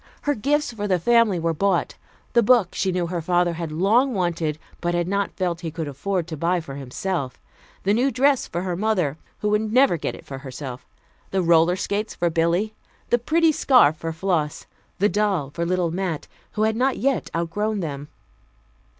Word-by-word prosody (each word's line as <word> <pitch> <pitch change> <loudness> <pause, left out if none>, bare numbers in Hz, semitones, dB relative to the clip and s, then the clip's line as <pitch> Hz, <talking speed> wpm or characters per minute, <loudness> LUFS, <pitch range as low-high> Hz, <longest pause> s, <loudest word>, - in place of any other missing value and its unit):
Her 290 - +2
gifts 285 +2 0
for 205 -2 -3
the 185 -2 +2
family 230 +1 +3
were 165 0 0
bought 190 +2 +1 0.4
the 235 - +5
book 230 -4 +4
she 190 - 0
knew 180 -1 0
her 170 0 -3
father 175 +1 +2
had 165 -1 -5
long 220 - +2
wanted 170 -4 -1 0.2
but 175 0 -1
had 175 0 0
not 200 +1 0
felt 175 -2 -1
he 165 - -3
could 160 0 -5
afford 165 +6 -2
to 165 -1 -6
buy 170 +4 +1
for 150 -5 -8
himself; 140 +2 -4 0.4
the 200 - +2
new 250 +5 +3
dress 270 0 +2
for 175 +2 -3
her 180 -2 -2
mother, 180 -7 0 0.2
who 210 - +1
would 210 +1 +1
never 255 -6 +4
get - - -3
it - - -13
for 135 -1 -7
herself; 130 -1 -8 0.4
the 190 -1 0
roller 170 +1 +4
skates 205 +3 -2
for 175 -1 0
Billy, 170 +6 +1 0.4
the 240 - +4
pretty 320 +6 +3
scarf 250 - +4
for 165 +1 -4
Floss, 160 -3 -1 0.3
the 205 - +3
doll 200 -9 0
for 170 +3 -2
little 180 -2 0
Mat, 175 -3 -3 0.3
who 215 - 0
had 220 0 +2
not 260 +3 +1
yet 270 0 0
outgrown 205 +5 -1
them. 145 -3 -5
180 Hz, 195 wpm, -23 LUFS, 165-215 Hz, 0.4 s, the